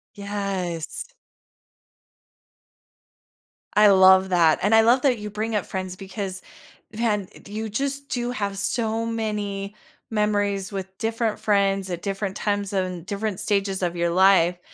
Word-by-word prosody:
Yes. 195 -5 -4 2.7
I 210 0 +7
love 190 -1 +6
that 165 -3 +4
and 205 +4 +3
I 225 - +7
love 240 +3 +4
that 255 -4 +2
you 210 0 -5
bring 215 +2 -3
up 205 - 0
friends 185 -1 -5
because 190 0 -6 0.5
then 210 -4 -1
i - - -15
you, 215 +2 -4
just, 275 +5 -3
do 245 -1 -2
have 200 -4 -3
so 225 +2 -1
many 210 -3 -3 0.4
memories 205 -2 0
with 190 -1 -6
different 225 -1 -1
friends 195 -2 +1
at 175 -1 -5
different 195 -1 -3
times, 205 -1 -1
and 185 -3 -2
different 200 -1 -3
stages 195 -2 0
of 175 -1 -1
your 170 0 0
life, 180 -1 +4
200 Hz, 140 wpm, -24 LUFS, 190-215 Hz, 2.7 s, I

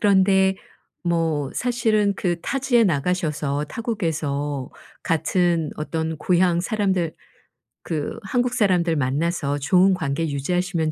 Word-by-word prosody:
그런데 190 -1 +4 0.5
뭐 165 -5 0
사실은 220 -4 +1
그 175 -2 -1
타지에 255 -4 +2
나가셔서 150 -3 0
타국에서 150 - -3 0.3
같은 165 -1 +1
어떤 160 +1 -3
고향 175 +1 +2
사람들 190 -6 0 0.7
그 155 +6 -3
한국 245 +5 0
사람들 180 -8 +2
만나서 145 +1 0
좋은 185 +6 +4
관계 160 -2 -1
유지하시면 165 +3 -1
175 Hz, 255 characters per minute, -23 LUFS, 155-195 Hz, 0.7 s, 그런데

